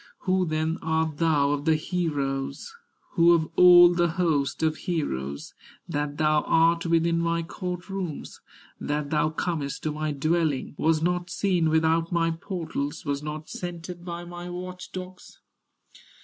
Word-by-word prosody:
Who 185 -1 +1
then 155 +1 -1
art 160 -1 -1
thou 150 -4 +3
of 145 0 -2
the 160 -1 +4
heroes, 145 - -2 0.4
Who 170 -1 +5
of 160 -1 0
all 175 -1 +8
the 175 0 +2
host 160 -5 0
of 155 -1 +2
heroes, 70 - -3 0.3
That 145 0 -3
thou 155 -1 +3
art 165 +1 +3
within 165 0 +2
my 170 0 0
court 180 +1 -5
rooms, 190 -6 -6 0.4
That 145 0 -3
thou 155 0 +2
comest 155 -3 -3
to 155 - -1
my 155 0 -2
dwelling, 155 -1 0
Was 160 +1 +1
not 180 +1 0
seen 180 -5 +1
without 160 +1 +2
my 165 -1 +1
portals, 165 -5 -4
Was 140 -1 -2
not 150 +1 -6
scented 175 0 -7
by 175 0 -6
my 175 0 -8
watch 180 +1 -7
dogs?" 185 0 -9
165 Hz, 150 wpm, -26 LUFS, 155-175 Hz, 0.4 s, all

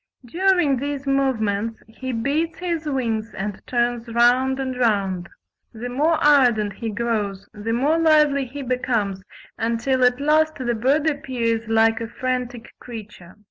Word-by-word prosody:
During 350 -1 +2
these 285 +1 -4
movements 230 -6 0
he 260 +4 -6
beats 280 +8 -1
his 340 -3 -3
wings 230 -5 -2
and 200 0 -5
turns 240 -1 0
round 245 +3 +3
and 260 -1 -3
round. 200 -7 0 0.4
The 240 +2 -6
more 300 +7 +2
ardent 245 -8 +4
he 225 +3 -5
grows 210 -3 -2
the 210 +2 -4
more 290 +7 +2
lively 300 -4 +4
he 275 +3 -7
becomes, 235 -6 -1 0.4
until 235 +3 0
at 250 +1 +3
last 310 +2 +2
the 245 -3 -2
bird 275 +7 +1
appears 245 -7 -1
like 225 0 +3
a 230 - -3
frantic 250 0 -4
creature." 210 -7 -10
245 Hz, 140 wpm, -22 LUFS, 225-280 Hz, 0.4 s, ardent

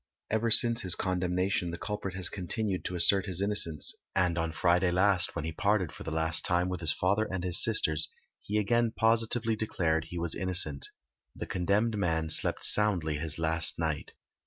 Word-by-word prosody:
Ever 110 +1 0
since 115 +1 +7
his 90 -2 +1
condemnation 90 0 -2
the 85 - -6
culprit 100 -1 -6
has 90 -2 -1
continued 95 +1 -3
to 90 - -4
assert 95 +3 +3
his 90 -2 -2
innocence, 100 -6 0 0.2
and 90 -3 +1
on 85 -1 -2
Friday 90 +2 +1
last, 90 0 +2
when 75 - -4
he 80 - -4
parted 100 0 -1
for - - -13
the - - -6
last 80 +1 +1
time 90 +1 0
with 90 -2 -4
his 80 -2 0
father 100 +4 -1
and 95 -2 -4
his 90 -2 +3
sisters, 80 0 +4 0.3
he 105 - -4
again 120 +3 +1
positively 115 0 +1
declared 80 -7 -2
he 85 +2 -9
was 85 -1 -3
innocent. 90 -7 +1 0.5
The - - -6
condemned 105 +5 -1
man 80 -4 -2
slept - - +1
soundly 90 -8 +1
his 80 -1 -3
last 80 0 0
night. 80 -3 -4
90 Hz, 185 wpm, -28 LUFS, 80-105 Hz, 0.5 s, since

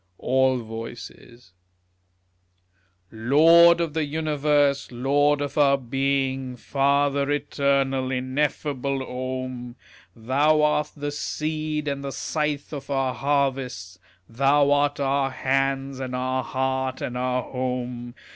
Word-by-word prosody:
All 130 0 +2
Voices 115 -1 -10 1.6
Lord 165 +9 +6
of 165 -3 -1
the 160 0 0
Universe, 145 -2 +1
Lord 145 +4 +2
of 145 +1 -3
our 140 -1 +5
being, 135 0 -1
Father 140 +2 +1
eternal, 140 -2 0
ineffable 135 +1 -1
Om! 130 -1 -5 0.4
Thou 145 +6 +2
art 150 0 +1
the 145 0 -3
Seed 155 0 -3
and 140 -1 -3
the 140 - -4
Scythe 150 0 -3
of 140 -1 -7
our 135 -2 0
harvests, 135 -10 -1 0.3
Thou 140 +4 +3
art 145 0 +2
our 135 0 +1
Hands 135 0 -1
and 130 -1 -4
our 130 0 -1
Heart 130 0 -2
and 125 - -4
our 125 0 -1
Home. 125 -1 -4
135 Hz, 110 wpm, -24 LUFS, 130-145 Hz, 1.6 s, Lord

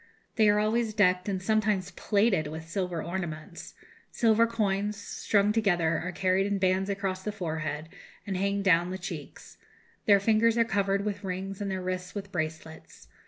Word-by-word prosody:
They 220 -2 +5
are 205 - +4
always 215 +1 +1
decked 185 -2 +3
and 190 -2 -1
sometimes 205 -1 0
plated 200 -4 +1
with 160 +2 -7
silver 180 -2 -2
ornaments. 170 -2 -6 0.3
Silver 230 0 +3
coins, 210 -2 -1
strung 205 0 +1
together, 175 -7 +2
are 180 - -4
carried 190 +2 +1
in 200 0 0
bands 190 +1 +1
across 195 -2 -2
the 210 - -3
forehead, 160 -5 -4 0.4
and 195 - -3
hang 200 +1 0
down 175 -2 +4
the 185 - -4
cheeks. 175 -5 -8 0.5
Their 200 -1 +7
fingers 225 +3 +3
are 230 - +4
covered 200 -1 0
with 205 0 -3
rings 190 +1 -4
and 200 - -2
their 190 -1 -3
wrists 180 +1 -4
with 200 -1 -6
bracelets. 160 -2 -6
195 Hz, 165 wpm, -28 LUFS, 180-210 Hz, 0.5 s, Their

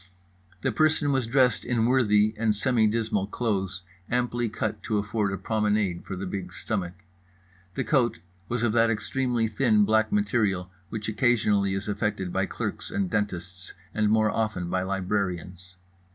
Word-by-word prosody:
The - - +1
person 155 -2 +2
was 130 -4 +1
dressed 125 -2 +3
in 115 -2 +1
worthy 110 -4 +3
and 110 -1 +1
semi 110 +1 +3
dismal 105 -3 0
clothes 95 -5 -2 0.3
amply 120 -1 0
cut 110 0 -3
to 110 - -1
afford 105 0 -1
a 95 - -2
promenade 105 -5 0
for 95 - -5
the 95 +2 -4
big 90 -1 -5
stomach. 90 -2 -3 0.8
The - - 0
coat 130 -5 +2 0.3
was 120 -1 -1
of 115 -3 +2
that 115 0 +4
extremely 120 +1 0
thin 110 -2 +3
black 110 - +2
material 105 - +1 0.2
which 110 -1 -4
occasionally 105 -4 +2
is 95 +2 -4
affected 100 -3 -2
by - - +1
clerks - - -4
and 95 -2 -2
dentists 90 -4 -3 0.2
and 110 -1 +2
more 110 0 +3
often 110 -6 -2
by 95 - +1
librarians. 95 -1 -3
105 Hz, 155 wpm, -26 LUFS, 95-115 Hz, 0.8 s, that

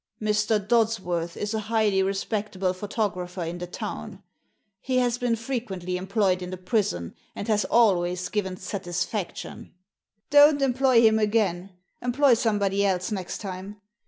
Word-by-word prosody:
"Mr. 215 0 +1
Dodsworth 195 -6 0
is 210 +1 -3
a 220 - 0
highly 215 -4 +2
respectable 195 -1 -1
photo 205 +3 -1
grapher 180 -1 -5
in 175 +1 -5
the 180 - -5
town. 205 +1 -7 0.6
He 255 +3 -1
has 245 -1 +1
been 245 -2 +1
frequently 220 -7 -4
em 185 +1 -5
ployed 195 -3 +1
in 180 - -5
the 185 - -5
prison, 180 - -1 0.2
and 205 - -5
has 210 -2 +2
always 185 -6 +2
given 190 -3 -2
satis 185 -2 -3
faction." 200 -4 -6 0.6
Don't 290 0 +7
employ 260 -2 +4
him 220 -1 +5
again. 200 -4 0 0.3
Employ 250 +2 +3
somebody 205 -3 +1
else 185 0 0
next 190 -4 -4
time. 195 +1 -7
205 Hz, 150 wpm, -25 LUFS, 185-225 Hz, 0.6 s, Don't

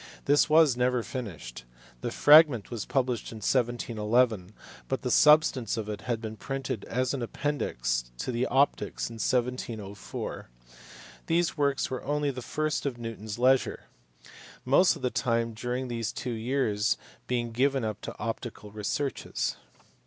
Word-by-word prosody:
This 145 +2 +4
was 155 -4 +6
never 125 -1 +1
finished: 80 - -7 0.4
the - - -2
fragment 145 -8 +6
was 115 -4 -4
published 125 -4 -1
in - - -8
1711, 115 -3 +1 0.4
but 135 - -2
the 125 - -1
substance 150 -7 +5
of 110 -2 -3
it 105 - -5
had 120 -2 -2
been 110 -1 -6
printed 135 -6 -4
as 130 +2 -1
an 135 - -3
appendix - - -2
to 60 - -3
the 120 +1 0
Optics 135 -3 +1
in 115 - -8
1704. 120 - -3 0.8
These 170 +1 +1
works 140 -3 0
were 130 - -4
only 145 0 0
the 130 -1 -7
fruit 155 +4 -2
of 130 -3 -3
Newton 115 -2 -7
s 110 0 -5
leisure; 130 +2 +2 0.8
most 155 +8 +5
of 150 - -11
his 125 - +1
time 115 -1 0
during 125 +3 -3
these 115 -3 -2
two 125 - -4
years 115 -3 0 0.3
being 120 -2 -1
given 135 +1 +1
up 105 -2 -4
to - - -7
optical 115 -2 -5
researches. 110 +7 -2
120 Hz, 150 wpm, -28 LUFS, 110-135 Hz, 0.8 s, was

